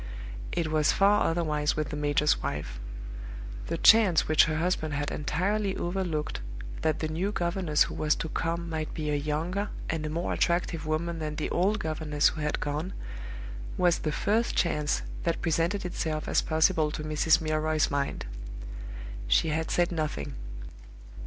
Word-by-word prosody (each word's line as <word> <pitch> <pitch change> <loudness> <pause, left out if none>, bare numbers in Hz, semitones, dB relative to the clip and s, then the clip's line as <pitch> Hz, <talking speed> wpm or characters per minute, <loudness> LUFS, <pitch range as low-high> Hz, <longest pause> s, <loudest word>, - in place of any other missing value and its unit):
It 160 -2 -1
was 155 -2 +4
far 200 +1 +4
otherwise 155 -3 +1
with 155 -2 -1
the 150 - -4
major's 145 0 +2
wife. 70 -4 -4 0.9
The - - -1
chance 205 -8 +6
which 155 -1 +6
her 155 -1 -1
husband 160 -3 0
had 145 0 -1
entirely 190 +7 0
overlooked, 175 - -2 0.4
that 155 - +1
the 155 - 0
new 170 +6 -1
governess 170 -4 +2
who - - -5
was 150 -1 +2
to 160 - -4
come 170 +2 -2
might 160 -2 -3
be 150 -2 -2
a - - +2
younger 160 +8 -1 0.2
and 160 -1 -2
a 155 - -2
more 170 +3 -1
attractive 170 -2 0
woman 165 +2 -1
than 155 -1 -3
the 150 - -2
old 195 +5 +2
governess 155 -5 +1
who 155 - -6
had 150 0 0
gone, 150 +5 -2 0.8
was 175 -2 +3
the 155 - -1
first 220 +9 +1
chance 150 -3 +1 0.2
that 170 -1 0
presented 170 +4 +1
itself 160 -3 -2
as - - +3
possible 160 0 +3
to 150 0 -5
Mrs. 155 +1 +3
Milroy's 155 -1 +1
mind. 140 0 -1 1.0
She - - +4
had 160 +1 -1
said 175 0 +2
nothing. 155 - -2
155 Hz, 160 wpm, -28 LUFS, 150-175 Hz, 1.0 s, chance